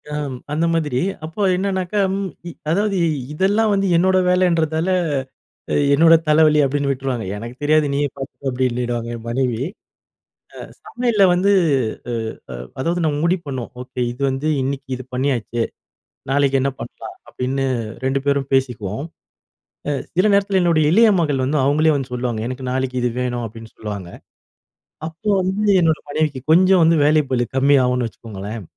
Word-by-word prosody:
அம், 145 -3 -3 0.2
அந்த 160 +3 +1
மாதிரி. 150 -6 0 0.3
அப்ப 190 +5 -1
என்னன்னாக்க 190 0 -2 0.2
ம் 195 -1 -3 0.2
இ - - -7 0.2
அதாவது 200 +2 +1 0.4
இதெல்லாம் 205 +6 +2
வந்து 195 0 +1
என்னோட 185 +2 +3
வேலன்றதால, 170 -2 +2 0.9
அ - - +1 0.2
என்னோட 165 +2 +6
தலைவலி 150 0 +5
அப்பிடின்னு 140 +1 0
விட்டுருவாங்க. 130 -4 -2
"எனக்கு 120 +4 -8
தெரியாது, 155 0 +3
நீயே 145 0 +1
பார்த்துக்கோ!" 135 0 -6
அப்பிடினிடுவாங்க 120 -2 -1
என் 115 -1 -8
மனைவி. 125 -2 -1 0.9
அ - - -11 0.3
சமையல்ல 235 -4 0
வந்து 195 +3 +2 0.6
அ - - -2 0.4
அ - - -6 0.3
அதாவது 170 +5 0
நம்ம 145 - 0
முடிவு 175 0 +1
பண்ணுவோம். 130 -3 -5
ஓகே, 125 0 -7
இது 125 - -15
வந்து 135 +4 -2
இன்னிக்கு 135 +1 -4
இது 130 - -9
பண்ணியாச்சு. 125 -3 -1 0.7
நாளைக்கி 140 -1 +2
என்ன 140 - +1
பண்ணலாம்? 120 - -8
அப்பிடின்னு, 135 +2 -2 0.4
2 135 +1 +1
பேரும் 140 -1 0
பேசிக்குவோம். 125 -2 -1 0.8
அ 145 - +1 0.2
சில 185 +3 +4
நேரத்தில 200 -1 +2
என்னுடைய 165 -3 +3
இளைய 225 +3 +6
மகள் 145 -5 0
வந்து 150 +3 0
அவுங்களே 155 +2 +3
வந்து 130 -2 -5
சொல்லுவாங்க, 120 -3 -2
"எனக்கு 130 0 -5
நாளைக்கி 130 -1 -2
இது 125 - +1
வேணும்." 120 -1 -2
அப்பிடின்னு 115 +1 -12
சொல்லுவாங்க. 100 -5 -6 1.0
அப்போ 165 +7 -8
வந்து, 200 +3 0
என்னோட 160 -2 +2
மனைவிக்கு 150 -3 -1
கொஞ்சம் 185 +1 +5
வந்து 165 0 +4
வேலைப்பளு 140 -5 +2
கம்மி 140 +2 +4
ஆவுன்னு 125 -1 +1
வச்சுக்கோங்களேன். 105 0 -7
140 Hz, 150 wpm, -20 LUFS, 125-170 Hz, 1.0 s, என்னோட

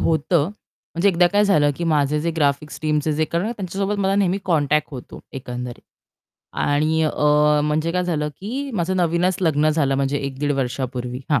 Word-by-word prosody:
होतं. 160 0 +2 0.5
म्हणजे 170 +4 +3
एकदा 175 -2 +4
काय 205 +1 +4
झालं, 150 -8 +3
की 170 - -3
माझे 150 -2 +1
जे 170 +2 -1
ग्राफिक्स 145 0 0
टीमचे 155 0 0
जे 155 +1 +1
कारण 170 +3 -2
काय, 225 - -2
त्यांच्यासोबत 195 +1 -2
मला 195 0 +1
नेहमी 195 -1 +2
कॉन्टॅक्ट 150 -4 +1
होतो, 125 -3 -9
एकंदरीत. 125 -2 -6 0.7
आणि, 155 +2 +1
अ, 155 - +2 0.5
म्हणजे 155 +2 0
काय 180 0 0
झालं, 150 -4 -1
की 265 +8 -4
माझं 185 -1 -1
नवीनच 175 +1 +1
लग्न 155 -3 +2
झालं, 145 -3 +1
म्हणजे 140 +1 0
1 140 -1 -5
दीड 145 0 0
वर्षापूर्वी 125 -2 -3
हां. 145 -3 +3
155 Hz, 180 wpm, -21 LUFS, 145-180 Hz, 0.7 s, एकदा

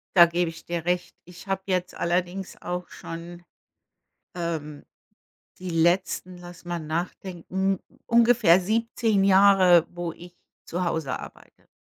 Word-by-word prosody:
Da 175 - +10
gebe 170 0 0
ich 165 - -12
dir 170 -1 -4
recht. 180 0 -1
Ich 180 +2 -14
habe 195 0 -1
jetzt 180 -1 -1
allerdings 180 +2 -2
auch 180 0 -5
schon, 170 +1 -9 0.9
ähm, 160 -4 -4 0.8
die 180 -1 -6
letzten 175 +2 0
lass 175 0 -12
mal 175 -1 -3
nachdenken. 180 +4 -3 0.3
Ungefähr 230 -6 +5
17 220 0 +1
Jahre, 190 -3 +6
wo 175 -1 -5
ich 175 +1 -14 0.3
zu 180 +2 -3
Hause 160 -5 -2
arbeite. - - -13
175 Hz, 125 wpm, -25 LUFS, 170-190 Hz, 0.9 s, Da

